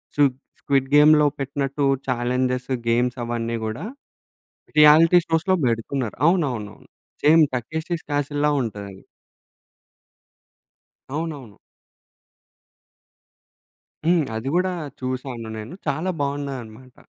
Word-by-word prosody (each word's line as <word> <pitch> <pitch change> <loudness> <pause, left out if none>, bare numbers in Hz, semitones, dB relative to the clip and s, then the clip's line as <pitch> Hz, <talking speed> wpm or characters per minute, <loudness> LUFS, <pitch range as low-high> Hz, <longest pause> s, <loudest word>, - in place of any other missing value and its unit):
చూద్ 140 -3 +3 0.3
స్క్విడ్‌గేమ్‌లో 145 +2 +4
పెట్టినట్టు 140 +1 -2 0.2
challenges, 125 +1 -1 0.2
games 120 +2 +1
అవన్నీ 115 0 -2
గూడా 110 - -4 0.9
రియాలిటీ 155 +3 +7
షోస్‌లో 165 +4 +1
బెడుతున్నారు. 115 +1 -2
అవునవునవును. 130 - -2 0.4
సేమ్ 160 +2 +7
'టకేషిష్ 160 +7 -4
క్యాసిల్‌‌లా' 145 +1 0
ఉంటదది. 100 -4 -7 2.1
అవునవును. 145 - -5 2.5
హ్మ్. 170 -1 +3
అది 110 +4 -4
గూడా 185 +1 +1 0.3
చూసాను 130 -2 -5
నేను, 110 +7 -8
చాలా 180 +4 -1
బాగున్నాయన్నమాట. 130 -4 -5
135 Hz, 80 wpm, -23 LUFS, 120-150 Hz, 2.5 s, రియాలిటీ